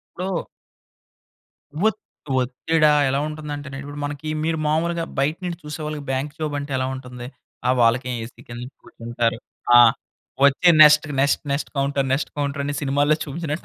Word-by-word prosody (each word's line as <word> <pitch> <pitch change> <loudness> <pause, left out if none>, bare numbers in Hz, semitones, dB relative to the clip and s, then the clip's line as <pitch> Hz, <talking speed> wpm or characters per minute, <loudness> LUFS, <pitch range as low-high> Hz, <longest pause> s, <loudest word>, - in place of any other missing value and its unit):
ఇప్పుడు 185 -1 -3 1.4
ఒత్ 220 - -3 0.4
ఒత్తిడా 150 +5 +2 0.2
ఎలా 135 +1 0
ఉంటుందంటే 150 -2 -6
ఇప్పుడు 145 +1 -8
మనకి 145 +1 -5 0.2
మీరు 160 0 0
మామూలుగా 165 +2 0
బయట 150 +4 +1
నుంచి 175 -1 -4
చూసే 150 +1 -6
వాళ్ళకి 150 -1 -4
బ్యాంక్ 135 +2 -2
జాబ్ 155 -2 -3
అంటే 145 0 -5
ఎలా 130 - 0
ఉంటుంది. 125 -2 -8 0.4
ఆ - - +5
వాళ్ళకే 120 +2 +3
ఏసీ 115 - -11
కింద 120 0 -7 0.2
కూర్చుంటారు. 120 0 -2 0.4
ఆ - - +10 0.7
వచ్చే 140 +5 +5
next, 150 0 +7
next, 140 0 +2
next 140 +2 -2
counter 140 0 0
next 135 - -1
counter 140 0 -1
అని 145 0 -2
సినిమాల్లో 145 +2 +2
చూపించినట్టు 155 +2 -4
145 Hz, 150 wpm, -22 LUFS, 135-155 Hz, 1.4 s, ఆ